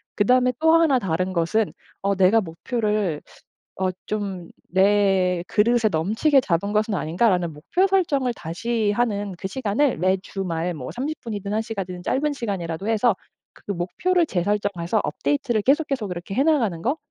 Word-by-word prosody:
그다음에 250 Hz, +4 st, +3 dB
또 320 Hz, 0 st, +4 dB
하나 325 Hz, -5 st, +4 dB
다른 185 Hz, -1 st, -1 dB
것은 185 Hz, +5 st, 0 dB, 0.3 s
어 200 Hz, 0 st, +1 dB
'내가 190 Hz, +4 st, +5 dB
목표를 210 Hz, -, -2 dB, 0.6 s
어 185 Hz, -1 st, +2 dB, 0.2 s
좀 195 Hz, -5 st, -4 dB, 0.2 s
내 190 Hz, -2 st, +3 dB
그릇에 230 Hz, +1 st, +3 dB
넘치게 220 Hz, -, +2 dB
잡은 200 Hz, 0 st, -1 dB
것은 215 Hz, 0 st, +1 dB
아닌가.'라는 180 Hz, 0 st, +1 dB
목표 180 Hz, -, 0 dB
설정을 300 Hz, -10 st, +1 dB
다시 210 Hz, +6 st, -2 dB
하는 205 Hz, -4 st, -1 dB
그 190 Hz, -, -4 dB
시간을 250 Hz, -, 0 dB
매 185 Hz, +2 st, +2 dB
주말 180 Hz, -3 st, -3 dB
뭐 130 Hz, -3 st, -6 dB
30 290 Hz, -, -4 dB
분이든 205 Hz, -3 st, -5 dB
1 220 Hz, -, +1 dB
시간이든 190 Hz, -5 st, -5 dB
짧은 290 Hz, +3 st, 0 dB
시간이라도 195 Hz, -6 st, -4 dB
해서 225 Hz, 0 st, +3 dB, 0.4 s
그 205 Hz, -, -6 dB
목표를 265 Hz, -, 0 dB
재설정해서 200 Hz, 0 st, 0 dB
업데이트를 260 Hz, -6 st, 0 dB
계속 295 Hz, +6 st, +3 dB
계속 255 Hz, -7 st, -2 dB
그렇게 180 Hz, +2 st, -6 dB
해 265 Hz, -, +3 dB
나가는 235 Hz, -, +2 dB
거. 270 Hz, +7 st, 0 dB
205 Hz, 330 characters per minute, -23 LUFS, 180-245 Hz, 0.6 s, 내가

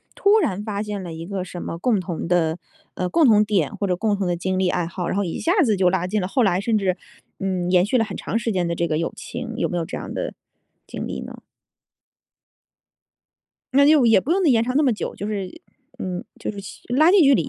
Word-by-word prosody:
突 415 Hz, +2 st, +4 dB
然 205 Hz, -, -1 dB
发 210 Hz, -1 st, -3 dB
现 205 Hz, -2 st, -4 dB
了 170 Hz, -, -6 dB
一 165 Hz, +1 st, -7 dB
个 195 Hz, -2 st, -3 dB
什 180 Hz, -1 st, -7 dB
么 165 Hz, -, -5 dB
共 215 Hz, +3 st, +1 dB
同 175 Hz, -3 st, -4 dB
的， 170 Hz, -2 st, +1 dB, 0.4 s
呃， 180 Hz, -, -1 dB
共 315 Hz, -, +4 dB
同 210 Hz, -2 st, +5 dB
点 190 Hz, -9 st, 0 dB
或 205 Hz, -, -2 dB
者 180 Hz, -2 st, +1 dB
共 205 Hz, +1 st, 0 dB
同 195 Hz, -, -1 dB
的 175 Hz, -1 st, 0 dB
经 185 Hz, +2 st, -2 dB
历 185 Hz, -1 st, +2 dB
爱 175 Hz, -1 st, -1 dB
好， 175 Hz, 0 st, -4 dB
然 -, -, -1 dB
后 200 Hz, -, +1 dB
一 170 Hz, -, -4 dB
下 335 Hz, -, +1 dB
子 220 Hz, -7 st, +2 dB
就 185 Hz, -1 st, +4 dB
拉 180 Hz, -1 st, 0 dB
近 210 Hz, +3 st, 0 dB
了 180 Hz, -, -2 dB
后 255 Hz, +7 st, +1 dB
来 190 Hz, -5 st, +3 dB
甚 220 Hz, +3 st, 0 dB
至， 185 Hz, -2 st, 0 dB, 0.4 s
嗯， 185 Hz, -2 st, -2 dB
延 180 Hz, 0 st, +4 dB
续 215 Hz, -, -1 dB
了 225 Hz, -, +3 dB
很 205 Hz, -3 st, -6 dB
长 225 Hz, -, -2 dB
时 230 Hz, -1 st, -1 dB
间 180 Hz, -3 st, 0 dB
的 170 Hz, -, -1 dB
这 170 Hz, 0 st, -1 dB
个 155 Hz, -, 0 dB
友 165 Hz, -, -2 dB
情。 235 Hz, -2 st, -6 dB
有 -, -, 0 dB
没 175 Hz, -, -2 dB
有 165 Hz, -, -1 dB
这 -, -, -6 dB
样 -, -, -6 dB
的 -, -, -3 dB, 0.5 s
经 -, -, -5 dB
历 -, -, -5 dB
呢？ -, -, -9 dB, 2.3 s
那 280 Hz, +1 st, +6 dB
就 290 Hz, -5 st, +5 dB
也 225 Hz, -4 st, +6 dB
不 285 Hz, -, -5 dB
用 380 Hz, +1 st, +2 dB
呢 310 Hz, -, +5 dB
延 230 Hz, -3 st, +4 dB
长 255 Hz, +3 st, -1 dB
那 300 Hz, -, +4 dB
么 260 Hz, -5 st, +3 dB
久， 215 Hz, -, -4 dB
就 205 Hz, -, -5 dB
是 210 Hz, -, -5 dB, 0.4 s
嗯， 180 Hz, -1 st, -4 dB
就 -, -, -3 dB
是 200 Hz, -, -10 dB, 0.4 s
拉 310 Hz, +6 st, +6 dB
近 390 Hz, -1 st, +6 dB
距 275 Hz, -1 st, +6 dB
离 270 Hz, -, 0 dB
200 Hz, 275 characters per minute, -22 LUFS, 180-230 Hz, 2.3 s, 那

